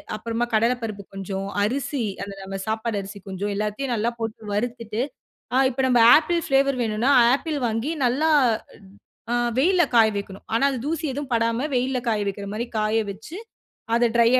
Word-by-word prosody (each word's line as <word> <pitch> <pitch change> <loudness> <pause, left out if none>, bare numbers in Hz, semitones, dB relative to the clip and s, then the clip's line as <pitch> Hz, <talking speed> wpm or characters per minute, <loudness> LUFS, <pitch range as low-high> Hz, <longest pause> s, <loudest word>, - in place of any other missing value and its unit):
அப்புறமா 230 +2 -2
கடலை 230 +3 +3
பருப்பு 205 -3 -5
கொஞ்சம், 195 0 -4 0.2
அரிசி 255 +3 -1 0.2
அந்த 200 - -7
நம்ம 195 0 -5
சாப்பாடு 220 0 -1
அரிசி 200 +1 -9
கொஞ்சம் 195 +2 -3
எல்லாத்தையும் 215 +5 -2
நல்லா 225 +1 +1
போட்டு 225 -1 -4
வறுத்துட்டு. 230 0 -2 0.5
ஆ - - +4
இப்ப 265 +1 -4
நம்ப 245 -2 +4 0.2
ஆப்பிள் 335 +2 +1
பிளேவர் 275 -1 +3
வேணுனா 225 +3 +1 0.2
ஆப்பிள் 300 +1 -2
வாங்கி 225 +5 -1
நல்லா 275 +6 +2 1.0
ட் - - -2
அ - - +2 0.2
வெயில்ல 355 +6 +4
காய 225 -1 +7
வைக்கணும். 200 -1 -6
ஆனா, 230 - +3
அது 260 - -3
தூசி 320 +1 -2
எதுவும் 280 0 -5
படாம 230 +3 +1
வெயில்ல 255 +1 +1
காய 215 -2 +1
வைக்கிற 200 0 -5
மாதிரி 225 +3 -3
காய 215 +1 +1
வச்சு, 220 - -9 0.6
அத 235 +1 +4
ட்ரையா 235 +2 +5
230 Hz, 170 wpm, -24 LUFS, 210-260 Hz, 1.0 s, காய